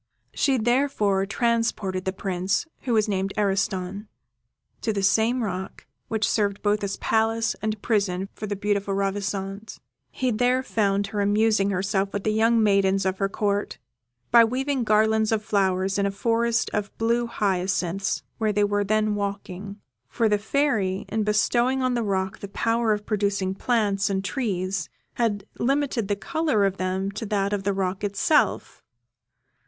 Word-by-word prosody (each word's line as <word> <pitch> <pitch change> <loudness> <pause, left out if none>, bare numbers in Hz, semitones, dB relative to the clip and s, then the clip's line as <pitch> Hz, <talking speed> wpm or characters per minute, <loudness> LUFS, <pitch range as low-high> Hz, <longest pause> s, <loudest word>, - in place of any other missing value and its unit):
She 270 -2 +2
therefore 225 -5 +1
transported 220 -5 0
the 190 - 0
Prince, 190 - -1 0.2
who 245 - 0
was 215 -1 +3
named 195 -1 -1
Ariston, 200 0 -1 0.7
to 225 - 0
the 200 -2 -2
same 225 +5 +2
rock 190 -2 -5 0.2
which 220 -2 0
served 205 -2 0
both 210 0 +1
as 200 0 -2
palace 225 0 +1
and 215 0 -2
prison 195 -4 0
for 215 - -6
the 205 - -2
beautiful 200 0 -1
Ravissante. 195 +1 -3 0.3
He 255 -1 -1
there 250 +3 +2
found 200 -4 +1
her 205 - 0
amusing 205 0 +2
herself 195 +1 -1
with 205 - -3
the 215 - +1
young 225 +1 +3
maidens 195 -1 +3
of 190 0 -1
her 195 -1 +1
Court, 205 0 -1 0.5
by 235 -1 +8
weaving 260 +2 -1
garlands 220 +1 +3
of 220 -1 0
flowers 190 -1 +1
in 200 - +2
a - - 0
forest 230 +3 0
of 205 -1 -1
blue 235 +1 +1
hyacinths, 195 -3 -1 0.2
where 215 -1 +1
they 205 0 +2
were 205 0 +1
then 215 +1 +1
walking, 200 0 -5 0.3
for 230 - +1
the 210 -1 +2
Fairy, 210 -6 0
in 220 +1 -1
bestowing 240 +5 +2
on 255 -1 +1
the 240 - 0
rock 190 -3 -1
the 200 - -6
power 230 +3 0
of 210 0 -1
producing 200 -3 0
plants 205 -2 0
and 195 0 -1
trees, 195 - -2 0.3
had 205 -4 0
limited 265 -4 0
the 205 - 0
colour 295 -2 0
of 195 0 -1
them 190 +1 -2
to 200 - -6
that 200 -1 0
of 205 - -1
the 200 +1 0
rock 190 0 -2
itself. 250 - +1
205 Hz, 160 wpm, -25 LUFS, 195-225 Hz, 0.7 s, by